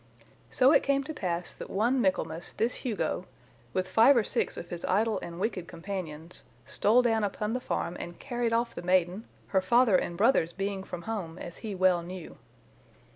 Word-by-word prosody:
So 260 +2 +5
it 285 - +6
came 275 0 +1
to 315 - -6
pass 175 - -3
that - - -9
one 240 +6 +2
Michaelmas 175 -4 -1
this 230 +3 0
Hugo, 215 -6 -2 0.4
with 185 +6 -1
five 235 +7 +6
or 230 - +4
six - - -1
of 175 - -7
his 175 -1 -6
idle 215 +3 +1
and 170 0 -7
wicked 190 -4 -2
companions, 170 -2 -6 0.2
stole 235 +5 +3
down 225 -2 +2
upon 210 +2 -2
the 250 - 0
farm 175 -7 -2
and 175 0 -7
carried 240 -3 -2
off 235 +1 +1
the - - -6
maiden, 180 +3 +1 0.2
her 190 - +3
father 235 +2 +4
and 175 -1 0
brothers 200 -6 +3
being 195 0 -3
from 180 -3 -7
home, 185 -7 -4
as 175 -1 -8
he 215 -4 -5
well 185 -2 +3
knew. 180 0 -9
195 Hz, 185 wpm, -29 LUFS, 175-230 Hz, 0.4 s, it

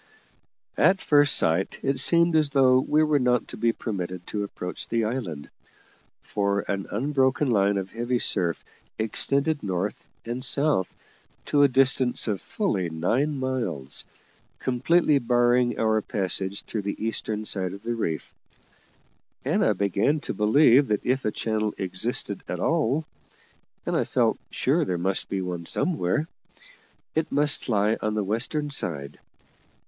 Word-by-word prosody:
At 190 +1 +4
first 145 -1 +4
sight 85 +4 +2
it 135 -1 0
seemed 170 +4 +4
as 155 -2 +3
though 130 -2 +4
we 150 +4 +2
were 150 -2 +2
not 125 -2 +1
to - - -7
be 115 - +2
permitted 90 -6 -5
to 105 -1 -3
approach 90 -2 -6
the 115 -1 +1
island, 105 - -4 0.7
for 100 -1 0
an 100 -1 -4
unbroken 135 +3 +1
line 100 -2 +2
of 95 0 -4
heavy 120 +2 -1
surf 85 -7 +1 0.3
extended 140 +7 0
north 95 +1 -3 0.2
and 120 +2 -4
south 140 -11 0 0.5
to 145 - +2
a 145 - +7
distance 130 -2 +2
of 100 -3 -1
fully 100 - -1
nine 125 - 0
miles, 120 - -2 0.5
completely 140 +4 +2
barring 120 0 +2
our 110 -1 +2
passing 95 -1 -1
through 100 +2 -5
the 100 +2 -4
eastern 110 -1 -3
side 95 -3 -2
of 100 +2 -10
the 120 +1 -2
reef; 85 -9 -3 1.1
and - - +1
I 110 - +3
began 100 - +1
to - - -4
believe 130 +5 +5
that 105 -1 -1
if 130 +2 0
a 105 - +1
channel 110 -1 -2
existed 95 +6 -3
at - - -4
all 140 +8 +1 0.8
(and - - -1
I - - +1
felt - - +1
sure - - +1
there 90 -2 -2
must 95 +3 -1
be 95 - -2
one 90 -2 -5
somewhere), 150 - 0 0.9
it 160 0 -1
must 145 -2 +1
lie 105 0 +2
on 110 0 -1
the 105 - 0
western 130 +9 -2
side. 75 - -4
115 Hz, 150 wpm, -25 LUFS, 100-135 Hz, 1.1 s, a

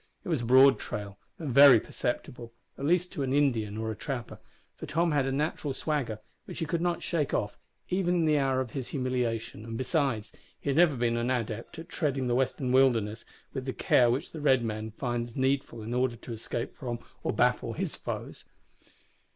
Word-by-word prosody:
It - - -7
was 155 -7 +1
a - - -3
broad 130 +2 +7
trail 100 -1 -6 0.2
and 150 -6 -4
very 140 -3 +9
perceptible, 120 +1 -4 0.2
at 140 - -5
least 180 +3 +2
to - - -4
an 135 -1 0
Indian 115 -8 +1
or 110 0 -2
a - - -5
trapper, 125 +2 -5 0.4
for - - -8
Tom 165 +2 +1
had 140 -3 +2
a - - 0
natural 145 0 -2
swagger, 140 -9 -2 0.3
which - - -8
he 165 - -1
could 165 +2 -1
not 175 -1 -1
shake 155 -5 0
off, 105 - -1 0.3
even 180 -1 +1
in 170 -2 +2
the 150 -1 +3
hour 135 -1 +1
of 125 -3 -5
his 130 -3 -4
humiliation, 125 -5 -2
and, 115 0 -6
besides, 130 -4 0 0.3
he 140 - -1
had 135 - -1
never 170 -4 +5
been 120 -1 0
an 120 +1 -1
adept 115 +1 -3
at 165 - -8
treading 140 -5 -1
the 120 - +1
western 130 0 0
wilderness 115 -5 +3 0.3
with 130 -2 -4
the 130 - -3
care 120 -1 +4
which 125 +5 -1
the 160 - -7
red 135 -4 +4
man 110 -1 -3
finds 120 0 -3
needful 130 -4 0
in 115 +3 -4
order 125 -1 +1
to 115 +1 -8
escape 115 +1 -4
from, 120 -4 -4 0.2
or - - -1
baffle, - - +1
his - - -3
foes. - - -6
130 Hz, 205 wpm, -29 LUFS, 115-145 Hz, 0.4 s, very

